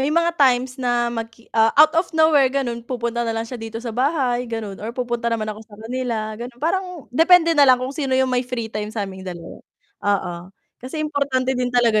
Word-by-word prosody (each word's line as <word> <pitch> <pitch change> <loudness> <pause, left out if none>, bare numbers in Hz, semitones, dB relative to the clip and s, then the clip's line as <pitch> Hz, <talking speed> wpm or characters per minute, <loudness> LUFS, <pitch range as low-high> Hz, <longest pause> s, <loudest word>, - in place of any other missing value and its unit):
may 270 - +1
mga 335 +2 +2
times 255 0 +3
na 240 -1 +1
mag 225 -1 -4 0.2
ah, 225 0 +4
out 305 +1 +7
of 335 +2 +1
nowhere 310 -4 +5
ganun 250 -3 -2
pupunta 235 -1 -3
na 230 -1 -1
lang 225 - -1
siya 235 0 -8
dito 225 0 -6
sa 230 -1 -5
bahay, 250 -2 0
ganun 220 -4 -5
or 230 +4 -6
pupunta 240 -1 -1
naman 225 -2 -1
ako 215 - -11
sa 215 -2 -15
kanila, 225 -1 -3
gano'n. 240 0 -7
Parang 360 +2 -2
depende 335 +3 +5
nalang 280 -5 +6
kung 265 - -4
sino 270 -3 -1
yung 260 -1 +2
may 250 - +2
free 245 -3 -5
time 210 0 -3
sa 215 -2 -3
aming 190 -1 -9
2. 175 -3 -8 0.5
Oo, 195 -3 0 0.5
kasi 310 +5 -4
importante 275 -3 0
din 250 -1 -1
talaga 240 -3 +3
245 Hz, 210 wpm, -21 LUFS, 225-275 Hz, 0.5 s, out